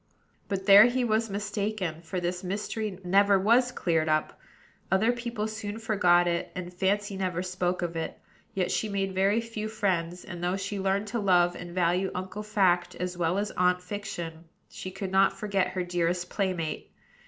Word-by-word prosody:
But 195 -1 -3
there 200 +1 +9
he 250 +1 +1
was 225 -1 +1
mistaken; 200 -4 -3
for 175 +2 -4
this 180 +1 -3
mystery 200 +1 -3
never 200 +2 +4
was 235 +6 +3
cleared 165 -7 0
up. 155 0 0 0.5
Other 205 +5 +4
people 235 -3 -3
soon 215 -1 -5
forgot 180 -6 +3
it, 170 0 -1
and 180 0 -6
Fancy 200 +2 0
never 185 -2 -2
spoke 180 -1 -1
of 170 -1 -3
it; 165 - -4 0.4
yet 185 -1 0
she 220 - 0
made 195 -1 -1
very 195 +4 +3
few 230 -2 -5
friends, 180 -5 -1
and, 175 -3 -7
though 180 +2 0
she 195 +1 -4
learned 195 +2 0
to 235 +2 -2
love 175 -3 +3
and 175 0 -8
value 180 +2 +2
Uncle 190 +3 -5
Fact 190 -5 +1
as 180 0 -4
well 175 +1 0
as 205 0 -1
Aunt 180 0 +2
Fiction, 175 -4 -6 0.2
she 185 - -7
could 190 0 -5
not 195 0 +3
forget 200 -2 0
her 185 -1 -3
dearest 175 0 -1
playmate. 185 -6 -2
190 Hz, 175 wpm, -28 LUFS, 180-205 Hz, 0.5 s, there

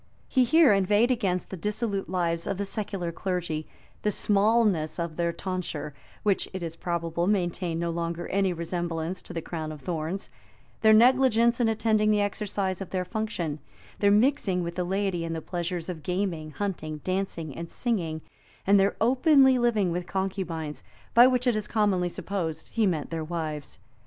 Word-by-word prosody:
He 255 -2 +3
here 295 -2 +6
inveighed 205 +5 +3
against 195 -7 -1
the - - -3
dissolute 205 0 -2
lives 170 -2 0
of 195 - -1
the 200 - -2
secular 195 -4 -3
clergy; 170 -3 -3 0.3
the 210 - +1
smallness 205 -5 +2
of 170 -2 -3
their 170 0 0
tonsure, 170 -4 -4 0.3
which, 200 -2 +1
it 185 -2 -4
is 165 -1 -4
probable, 170 0 -2
maintained 175 -4 0
no 170 0 -1
longer 170 0 -3
any 195 -1 +2
resemblance 170 0 -3
to - - -10
the 165 - -4
crown 160 -2 -4
of 150 -2 -9
thorns; 170 +3 -4 0.5
their 220 - +6
negligence 235 0 +5
in 240 - +3
attending 220 -1 +2
the 210 -1 +3
exercise 200 -2 -2
of 195 - -5
their 185 -1 -2
function; 180 -7 -3 0.4
their 200 - +4
mixing 205 -4 +3
with 170 0 -4
the 180 - -1
laity 190 -1 -1
in 165 0 -3
the 165 - -2
pleasures 175 0 -4
of 175 -4 -5
gaming, 180 -2 -2
hunting, 155 -3 -4
dancing, 185 -6 -3
and 170 0 -6
singing; 170 -10 -2 0.4
and 200 +1 +5
their 195 +1 +2
openly 265 +2 +5
living 220 -7 +2
with 175 +1 -3
concubines, 180 -6 -3 0.3
by 240 +2 +8
which 250 -1 +1
it 245 -3 +3
is 215 -1 -2
commonly 200 -5 +1
supposed 165 -4 -4
he 225 -3 +1
meant 160 -5 -2
their 165 -1 -2
wives. 155 -3 -4
185 Hz, 170 wpm, -27 LUFS, 170-210 Hz, 0.5 s, by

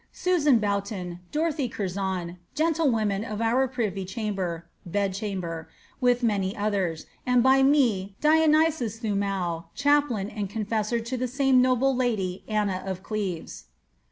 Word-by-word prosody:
Susan 310 -8 +3
Boughton, 200 -4 -2
Dorothy 300 -4 0
Curzon, 190 -4 -3 0.2
jantlewomen 255 -11 +1
of 215 -2 -5
our 240 +4 +2
privy 220 -7 -2
chamber 185 -4 -3 0.2
(bed 200 +2 -1
ihunber), 185 -5 -4 0.3
with 245 -1 +2
many 200 -4 0
others; 195 -6 -1 0.2
and 250 -1 +3
by 265 +1 +5
me, 235 -9 +3
Dionysius 310 -6 +3
Thomow,^ 195 -6 -2
chaplain 285 -8 +2
and 205 -3 -4
m/rsjor 220 +1 -1
to 255 +2 -3
the 255 +1 -1
same 270 +1 +2
most - - +7
noble 255 +1 +2
lady 210 -8 -1
Anna 205 -4 0
of 190 -1 -4
Cieves." 195 -6 -4
215 Hz, 130 wpm, -26 LUFS, 195-255 Hz, 0.3 s, most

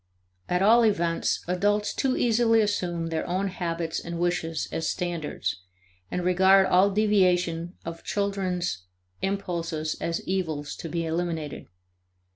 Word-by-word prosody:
At 180 +1 +2
all 230 +4 +6
events, 170 -6 +1
adults 205 +3 +1
too 265 -1 0
easily 230 -1 +3
assume 180 -6 0
their 160 -1 -1
own 190 +3 0
habits 170 -3 -3
and 170 0 -6
wishes 165 -2 -1
as 160 - -1
standards, 175 - -3 0.5
and 180 - -2
regard 190 +2 +5
all 190 +2 +4
deviations 180 -5 +2
of 165 0 -7
children's 185 - -2 0.4
impulses 170 -5 -2
as 165 0 -3
evils 160 -6 -2
to 165 - -6
be 170 +1 -2
eliminated. 165 -2 -3
180 Hz, 125 wpm, -26 LUFS, 165-195 Hz, 0.5 s, all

